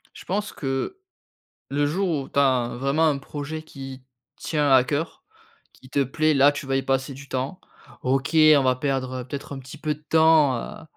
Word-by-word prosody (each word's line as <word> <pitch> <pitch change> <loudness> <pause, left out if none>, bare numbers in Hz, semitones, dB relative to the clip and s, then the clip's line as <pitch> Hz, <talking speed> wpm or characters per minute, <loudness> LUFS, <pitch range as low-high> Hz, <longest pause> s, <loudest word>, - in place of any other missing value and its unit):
Je - - -12
pense 205 +3 -2
que 135 - -3 0.7
le 145 +1 +1
jour 185 +5 0
où 145 -5 -2
tu - - 0
as 130 -3 +2
vraiment 140 +5 +2
un 145 -3 +1
projet 145 +3 -6
qui 135 -3 -9 0.3
tient 150 -2 -1
à 130 -1 +7
cœur, 145 +5 -3 0.5
qui 130 - -18
te 140 +1 +1
plaît, 155 +4 +1
là 140 +1 +6
tu 145 0 -6
vas 135 0 -1
y 135 - +2
passer 135 +1 -1
du 140 +1 -11
temps. 130 +7 -3 0.4
OK, 135 +3 0
on 155 -3 +7
va 130 -1 +3
perdre, 130 -1 -2
heu, - - -9
peut-être 140 +1 -6
un - - -7
petit 130 +3 -11
peu 150 +1 -1
de 150 - -23
temps, 160 -4 +5
heu, 140 - -8
140 Hz, 200 wpm, -24 LUFS, 135-155 Hz, 0.7 s, à